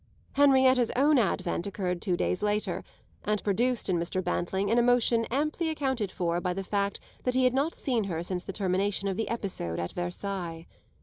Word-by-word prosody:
Henrietta's 260 Hz, -3 st, +5 dB
own 285 Hz, +2 st, +4 dB
advent 185 Hz, -4 st, 0 dB
occurred 180 Hz, -3 st, -2 dB
two 180 Hz, -4 st, 0 dB
days 180 Hz, -, 0 dB
later 210 Hz, 0 st, -1 dB, 0.4 s
and 210 Hz, 0 st, -1 dB
produced 235 Hz, +4 st, +1 dB
in 180 Hz, -3 st, +1 dB
Mr. 185 Hz, +2 st, -2 dB
Bantling 190 Hz, +4 st, -1 dB
an 235 Hz, -, +4 dB
emotion 240 Hz, -1 st, +3 dB
amply 305 Hz, +6 st, -1 dB
accounted 265 Hz, -10 st, -1 dB
for 175 Hz, -1 st, -1 dB
by 180 Hz, -1 st, -1 dB
the 195 Hz, -, -3 dB
fact 200 Hz, 0 st, -1 dB, 0.2 s
that 250 Hz, 0 st, 0 dB
he 260 Hz, -, +3 dB
had 255 Hz, -1 st, +4 dB
not 280 Hz, +5 st, 0 dB
seen 240 Hz, -7 st, 0 dB
her 170 Hz, -3 st, -3 dB
since 180 Hz, 0 st, -2 dB
the -, -, -5 dB
termination 195 Hz, +1 st, 0 dB
of 195 Hz, -, -1 dB
the 225 Hz, -, -2 dB
episode 190 Hz, -, -3 dB
at 85 Hz, 0 st, -3 dB
Versailles. 175 Hz, -2 st, -4 dB
200 Hz, 185 wpm, -28 LUFS, 180-250 Hz, 0.4 s, Henrietta's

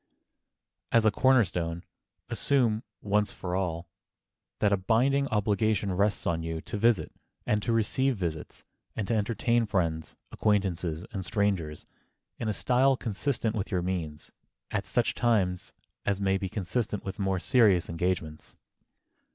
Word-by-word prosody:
As 115 Hz, -1 st, +4 dB
a 110 Hz, -, +5 dB
corner 130 Hz, +2 st, +5 dB
stone, 85 Hz, -1 st, -3 dB, 0.4 s
assume, 120 Hz, -6 st, +1 dB, 0.2 s
once 105 Hz, 0 st, +1 dB
for 90 Hz, -1 st, -4 dB
all, 85 Hz, -3 st, -2 dB, 0.7 s
that 105 Hz, -1 st, +2 dB
a -, -, +3 dB
binding 130 Hz, +8 st, +2 dB
obligation 105 Hz, -2 st, +1 dB
rests 100 Hz, +3 st, +1 dB
on 85 Hz, -3 st, 0 dB
you 80 Hz, 0 st, -3 dB
to -, -, -6 dB
visit, 115 Hz, 0 st, +2 dB, 0.3 s
and 105 Hz, 0 st, +1 dB
to 115 Hz, -, -1 dB
receive 125 Hz, +4 st, +1 dB
visits, 80 Hz, -5 st, -5 dB, 0.3 s
and 105 Hz, -, -3 dB
to -, -, 0 dB
entertain 115 Hz, +2 st, +1 dB
friends, 80 Hz, -5 st, -1 dB, 0.2 s
acquaintances 90 Hz, -5 st, 0 dB
and 100 Hz, -4 st, -4 dB
strangers 95 Hz, -7 st, -1 dB, 0.5 s
in 110 Hz, -, -2 dB
a -, -, +2 dB
style 130 Hz, +4 st, +3 dB
consistent 115 Hz, 0 st, -2 dB
with 100 Hz, -, -2 dB
your 90 Hz, -3 st, -1 dB
means, 85 Hz, -5 st, -4 dB, 0.4 s
at -, -, -2 dB
such -, -, +1 dB
times 100 Hz, -7 st, +1 dB, 0.3 s
as 100 Hz, -1 st, 0 dB
may 95 Hz, -1 st, +1 dB
be 95 Hz, -, -3 dB
consistent 105 Hz, +2 st, -2 dB
with 95 Hz, +1 st, -5 dB
more 95 Hz, -1 st, +1 dB
serious 100 Hz, -3 st, +3 dB
engagements. 85 Hz, -2 st, -3 dB
100 Hz, 145 wpm, -28 LUFS, 90-115 Hz, 0.7 s, a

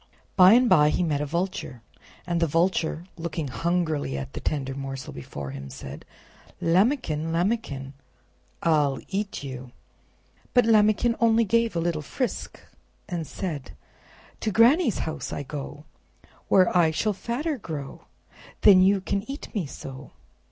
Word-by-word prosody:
By 185 Hz, +1 st, +8 dB
and 250 Hz, +1 st, +5 dB
by 150 Hz, -8 st, +5 dB
he 180 Hz, -, +1 dB
met 150 Hz, -4 st, 0 dB
a 150 Hz, -, -2 dB
Vulture, 170 Hz, -7 st, -3 dB, 0.4 s
and 170 Hz, -1 st, -1 dB
the 165 Hz, -, +3 dB
Vulture, 165 Hz, 0 st, 0 dB
looking 165 Hz, -3 st, -4 dB
hungrily 160 Hz, -, -1 dB
at 70 Hz, -, -6 dB
the -, -, -5 dB
tender 135 Hz, -3 st, -2 dB
morsel 135 Hz, -1 st, -6 dB
before 70 Hz, 0 st, -7 dB
him, 70 Hz, 0 st, -8 dB
said: 70 Hz, +1 st, -9 dB, 0.5 s
"Lambikin! 170 Hz, -, +1 dB
Lambikin! 165 Hz, -, -1 dB, 0.7 s
I'll 150 Hz, -5 st, +2 dB
EAT 200 Hz, -4 st, -3 dB
YOU!" 130 Hz, -2 st, -7 dB, 0.8 s
But 245 Hz, -2 st, +6 dB
Lambikin 215 Hz, +1 st, +4 dB
only 230 Hz, 0 st, +4 dB
gave 230 Hz, 0 st, +1 dB
a -, -, +1 dB
little 165 Hz, -2 st, -1 dB
frisk, 250 Hz, -, -4 dB, 0.5 s
and 170 Hz, -5 st, -4 dB
said: 160 Hz, -8 st, -5 dB, 0.7 s
"To -, -, -1 dB
Granny's 235 Hz, -, +4 dB
house 160 Hz, -, -5 dB
I 145 Hz, -, -4 dB
go, 145 Hz, +1 st, -7 dB, 0.6 s
Where 185 Hz, -2 st, +4 dB
I 170 Hz, -2 st, +5 dB
shall 210 Hz, +7 st, 0 dB
fatter 265 Hz, -, -3 dB
grow, 150 Hz, -8 st, -7 dB, 0.6 s
Then 190 Hz, -3 st, +8 dB
you 195 Hz, +1 st, +4 dB
can 200 Hz, +1 st, -1 dB
eat 275 Hz, -, -7 dB
me 195 Hz, -9 st, -2 dB
so." 135 Hz, 0 st, -9 dB
170 Hz, 145 wpm, -25 LUFS, 145-210 Hz, 0.8 s, By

